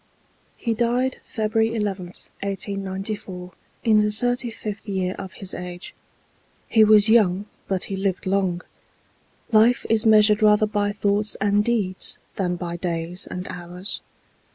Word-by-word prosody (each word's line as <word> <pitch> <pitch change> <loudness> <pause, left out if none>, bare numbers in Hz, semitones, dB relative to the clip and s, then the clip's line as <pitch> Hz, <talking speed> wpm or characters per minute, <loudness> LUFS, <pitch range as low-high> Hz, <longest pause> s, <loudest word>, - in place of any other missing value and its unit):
He 230 - -1
died 240 +3 0
February 220 0 0
11th, 190 -3 -5
1894, 195 -1 -4 0.3
in 215 -2 +5
the 210 0 +1
thirty 245 +3 -1
fifth 215 -1 -7
year 185 -2 -1
of 190 -1 -7
his 195 -2 -6
age. 180 0 -7 0.7
He 220 - +5
was 215 0 +6
young, 205 -4 +4 0.2
but 190 -2 -1
he 195 - -3
lived 190 -1 -1
long. 185 -2 0 0.9
Life 225 +2 +4
is 225 0 +3
measured 215 0 +6
rather 210 0 +5
by 205 -1 0
thoughts 205 +1 +1
and 205 0 +2
deeds 210 -5 -1 0.2
than 180 -2 -1
by 170 -1 -5
days 170 +1 -3
and 180 0 -6
hours. 180 +2 -4
205 Hz, 135 wpm, -23 LUFS, 185-215 Hz, 0.9 s, was